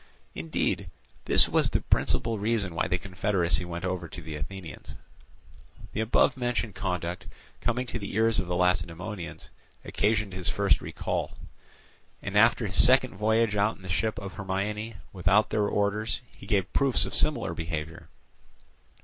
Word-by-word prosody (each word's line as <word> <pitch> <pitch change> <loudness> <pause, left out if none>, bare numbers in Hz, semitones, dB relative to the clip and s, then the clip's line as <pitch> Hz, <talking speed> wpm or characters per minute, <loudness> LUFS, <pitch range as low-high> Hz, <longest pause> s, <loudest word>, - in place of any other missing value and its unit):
Indeed, 80 0 -2 0.4
this - - +8
was - - +2
the - - 0
principal 115 -2 0
reason 105 -4 -1
why 80 - -1
the 90 - 0
confederacy 95 -2 0
went 85 +1 -5
over 90 -2 -3
to 90 - -9
the 80 -2 -7
Athenians. 85 +3 -8 1.0
The 110 - -1
above 110 - +3
mentioned 120 -4 -2
conduct, 90 -1 -4 0.3
coming 125 +2 -1
to 115 -1 -5
the 100 -2 -6
ears 110 0 +3
of 90 - -2
the 90 - -2
Lacedaemonians, 90 +1 -2 0.3
occasioned 105 -2 0
his 90 -1 -2
first - - +2
recall. - - -4 0.8
And - - -6
after - - +4
his - - +7
second - - +4
voyage 110 +1 +1
out 105 +2 +1
in - - -18
the 95 - -9
ship 110 +6 -1
of 100 -1 -6
Hermione, 105 +3 -3 0.2
without 95 +3 +2
their 105 -1 +1
orders, 105 +3 -1
he 100 - -13
gave 100 -4 0
proofs 140 -3 +2
of - - -6
similar - - +1
behaviour. 80 -1 -5
100 Hz, 155 wpm, -27 LUFS, 90-110 Hz, 1.0 s, this